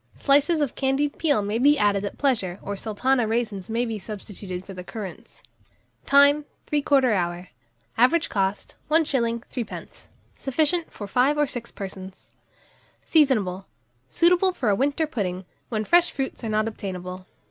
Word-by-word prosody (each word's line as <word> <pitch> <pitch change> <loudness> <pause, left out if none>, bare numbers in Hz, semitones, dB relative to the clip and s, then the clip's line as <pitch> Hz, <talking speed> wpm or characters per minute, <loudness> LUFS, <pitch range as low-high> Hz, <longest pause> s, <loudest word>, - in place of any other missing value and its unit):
Slices 290 +3 +3
of 285 - 0
candied 275 +2 0
peel 290 -10 +2
may 210 +3 -1
be 290 +3 +5
added 205 -4 +2
at 200 - -6
pleasure, 210 -11 0
or 200 - -4
Sultana 230 +4 0
raisins 220 -4 -2
may 235 +2 0
be 225 -2 -4
substituted 195 -2 -7
for 195 - -9
the 180 -1 -8
currants. 195 -1 -9 0.6
Time. 285 +1 +5 0.2
3/4 280 -4 +2
hour. 175 -1 -2 0.5
Average 305 +7 +4
cost, 195 -1 -2 0.2
1s. 260 -7 +1
3d. 240 -4 -7 0.3
Sufficient 315 +5 0
for 205 - -7
5 260 +7 +2
or 295 - +3
6 245 -4 -5
persons. 190 -1 -9 0.7
Seasonable. 210 - +2 0.4
Suitable 360 +2 +4
for 245 -10 -1
a 200 - +3
winter 285 +7 +1
pudding, 190 - -3 0.2
when 215 -2 -2
fresh 345 +5 +4
fruits 265 -2 -4
are 225 - -2
not 215 +1 +1
obtainable. 185 -3 -6
230 Hz, 145 wpm, -24 LUFS, 200-285 Hz, 0.7 s, be